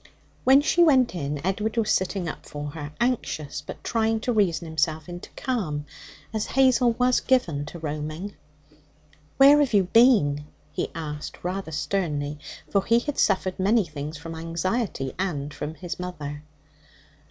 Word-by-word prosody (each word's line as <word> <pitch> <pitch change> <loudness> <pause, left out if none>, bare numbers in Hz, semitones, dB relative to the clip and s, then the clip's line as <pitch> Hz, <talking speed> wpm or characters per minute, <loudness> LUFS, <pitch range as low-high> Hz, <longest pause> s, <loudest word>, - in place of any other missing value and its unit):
When 270 +2 +7
she 345 +3 +4
went 260 -7 +4
in, 145 -4 -3
Edward 210 +4 -1
was 225 -2 +2
sitting 190 -1 0
up - - -7
for 145 0 -6
her, 150 -1 -7
anxious, 225 - -1
but - - -9
trying 225 -1 +1
to 245 - 0
reason 180 -6 +1
himself 155 0 -1
into 175 0 -8
calm, 185 - -2 0.5
as 215 -1 -1
Hazel 255 -2 +4
was 250 +1 +3
given 165 - +1
to 170 - -8
roaming. 155 +5 -5 1.0
'Where 280 +2 +8
have 275 -7 +2
you 200 - +5
been?' 180 - +4 0.3
he - - -2
asked 150 -2 -6
rather 180 -1 -3
sternly, 150 -2 -2 0.3
for 200 -1 +1
he 230 - +4
had 275 +4 -2
suffered 190 -2 +1
many 205 +2 +3
things 150 0 -6
from 165 +2 -7
anxiety 165 - -2
and 150 -7 -2
from 155 +2 -5
his 175 +1 -6
mother. 150 -5 -5
180 Hz, 155 wpm, -25 LUFS, 150-230 Hz, 1.0 s, Where